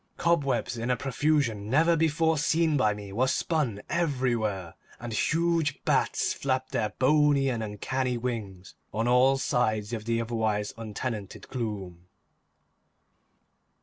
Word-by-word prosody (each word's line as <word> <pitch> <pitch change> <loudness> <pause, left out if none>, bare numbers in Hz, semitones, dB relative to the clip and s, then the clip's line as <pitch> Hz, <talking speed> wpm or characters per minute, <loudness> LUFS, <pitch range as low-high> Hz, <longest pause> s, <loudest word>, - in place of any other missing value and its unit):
Cobwebs 140 -8 +1
in 115 +2 -3
a 125 - +2
profusion 135 -6 0
never 165 +6 +4
before 160 0 +2
seen 160 +1 +2
by 110 -7 +2
me 100 -1 -9
were 125 +5 +2
spun 130 - -1
everywhere, 120 - -1 0.3
and 120 -1 -6
huge 165 +3 0
bats - - +1
flapped 130 -1 -2
their 105 - 0
bony 145 0 +3
and 120 -3 -2
uncanny 125 +4 -2
wings 110 -7 -5 0.2
on 115 +3 -1
all 130 +2 +4
sides 110 -4 0
of 110 -2 -4
the 115 0 0
otherwise 110 -3 -1
untenanted 110 -1 -5
gloom. 95 -8 -5
125 Hz, 125 wpm, -28 LUFS, 110-145 Hz, 0.3 s, never